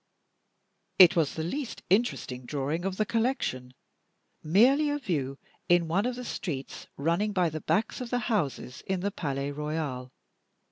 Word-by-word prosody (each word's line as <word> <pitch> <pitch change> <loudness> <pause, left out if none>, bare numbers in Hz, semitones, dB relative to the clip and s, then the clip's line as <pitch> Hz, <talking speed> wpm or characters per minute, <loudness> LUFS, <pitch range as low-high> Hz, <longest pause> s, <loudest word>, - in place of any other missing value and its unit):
It 185 -1 +9
was 160 -4 +1
the 160 - -2
least 260 - -4
interesting 175 - 0
drawing 150 +5 -2
of 190 -1 -2
the 215 - +1
collection 205 - -1 0.7
merely 255 - +4
a 290 - 0
view 145 - -2 0.3
in 175 -1 +4
one 195 +8 +1
of 250 - -2
the 250 0 -7
streets 140 - -5
running 170 +8 0
by 180 -3 +2
the 155 0 -5
backs 220 +4 0
of 245 - -5
the 245 - 0
houses 145 - -2
in 190 -1 -1
the 200 +2 -1
Palais 140 -5 -3
Royal. 145 -4 -4
170 Hz, 155 wpm, -28 LUFS, 140-215 Hz, 0.7 s, It